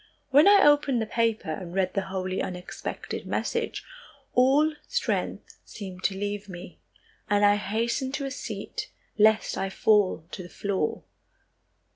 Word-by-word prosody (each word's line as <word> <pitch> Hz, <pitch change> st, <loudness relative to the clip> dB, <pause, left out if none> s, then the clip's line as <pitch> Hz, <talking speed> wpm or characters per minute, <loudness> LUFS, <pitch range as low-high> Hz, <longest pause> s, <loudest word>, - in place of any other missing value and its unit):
When 290 Hz, +7 st, +7 dB
I 405 Hz, 0 st, +7 dB
opened 290 Hz, -4 st, +4 dB
the 220 Hz, -, -1 dB
paper 225 Hz, -6 st, 0 dB
and 175 Hz, +2 st, -6 dB
read 185 Hz, -1 st, +1 dB
the 195 Hz, -1 st, -1 dB
wholly 185 Hz, 0 st, -2 dB
unexpected 180 Hz, -1 st, -6 dB
message, -, -, -2 dB, 0.5 s
all 275 Hz, +5 st, +4 dB
strength 485 Hz, -, -2 dB
seemed 185 Hz, -3 st, -9 dB
to 190 Hz, -, +1 dB
leave 205 Hz, 0 st, -4 dB
me, 175 Hz, -1 st, -10 dB, 0.5 s
and 205 Hz, 0 st, +4 dB
I 205 Hz, 0 st, +5 dB
hastened 235 Hz, +6 st, -1 dB
to 280 Hz, -, -3 dB
a 270 Hz, -, -4 dB
seat, -, -, -6 dB, 0.3 s
lest 220 Hz, -1 st, +3 dB
I 195 Hz, 0 st, -1 dB
fall 195 Hz, -5 st, +2 dB
to -, -, -6 dB
the 175 Hz, -, -10 dB
floor. 195 Hz, -6 st, -2 dB
205 Hz, 145 wpm, -27 LUFS, 190-260 Hz, 0.5 s, When